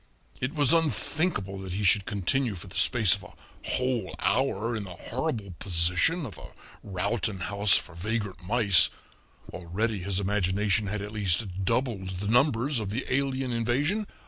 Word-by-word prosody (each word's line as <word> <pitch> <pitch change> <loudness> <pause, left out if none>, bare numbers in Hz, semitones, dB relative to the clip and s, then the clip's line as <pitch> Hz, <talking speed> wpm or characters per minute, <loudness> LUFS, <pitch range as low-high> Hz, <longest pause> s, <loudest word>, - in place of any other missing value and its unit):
It 130 +5 -3
was 145 -2 +5
unthinkable 145 - 0
that 95 -2 -6
he 100 +2 -2
should 100 +1 +3
continue 105 +4 0
for 85 - -8
the 95 0 -12
space 100 0 +4
of - - -3
a - - -13 0.4
whole 125 -6 0
hour 120 -3 0
in 110 - -3
the 90 -3 -8
horrible 115 - -4
position 90 - +1
of 105 -9 -8
a - - -11 0.3
Rowton 100 +1 -2
House 100 +3 +3
for 80 - -6
vagrant 100 +2 -3
mice 100 -2 +4 0.6
already 100 +5 -2
his 95 +1 -1
imagination 100 +1 0
had 105 0 -3
at 105 - -6
least 95 -2 -1
doubled 105 -5 -1
the 100 +2 -4
numbers 125 +2 +2
of 105 -3 -4
the 115 +6 -3
alien 135 -1 0
invasion. 140 - 0
105 Hz, 160 wpm, -27 LUFS, 95-125 Hz, 0.6 s, was